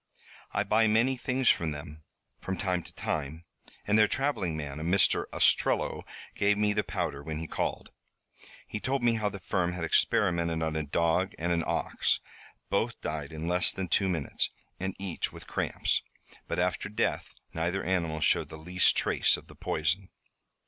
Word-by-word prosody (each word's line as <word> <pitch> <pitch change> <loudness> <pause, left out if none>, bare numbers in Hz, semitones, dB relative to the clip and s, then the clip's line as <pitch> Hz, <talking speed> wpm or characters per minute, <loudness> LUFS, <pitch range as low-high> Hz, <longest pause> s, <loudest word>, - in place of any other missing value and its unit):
I 105 - +1
buy 110 +2 +3
many 115 +5 +3
things 130 0 -1
from 80 - +2
them, 75 +1 -7 0.4
from 95 -1 -4
time 90 -3 0
to - - -12
time, 80 +2 -3 0.4
and 105 +2 +3
their 105 - +6
traveling 100 - 0
man, 75 -1 -5
a - - -4
Mr. 90 +3 +4
Ostrello, - - +2 0.3
gave 100 0 +2
me 105 0 +2
the 105 - +1
powder 80 -7 -3
when 80 +1 -5
he 80 - -4
called. - - -3 0.8
He 105 - -4
told 135 +2 -1
me 120 -1 +4
how 110 -2 0
the 100 - -8
firm 90 0 -1
had 90 -1 -4
experimented 85 -2 +2
on 80 0 -1
a 80 - 0
dog 85 +5 +1
and 85 +2 -1
an 85 -1 +1
ox. - - +1 0.5
Both - - 0
died 75 -2 -4
in 80 +1 -5
less 90 +1 +4
than 95 -2 -4
two 95 +3 +3
minutes, 80 -7 -1 0.3
and 95 0 -3
each 95 -3 -3
with - - -11
cramps. - - 0 0.5
But - - -2
after 90 +3 0
death 105 - -1 0.2
neither 85 +4 -1
animal 85 -4 -1
showed - - +3
the 80 - -8
least 90 +4 +3
trace - - +3
of - - -12
the - - -15
poison." 85 +5 -1
90 Hz, 175 wpm, -29 LUFS, 80-100 Hz, 0.8 s, their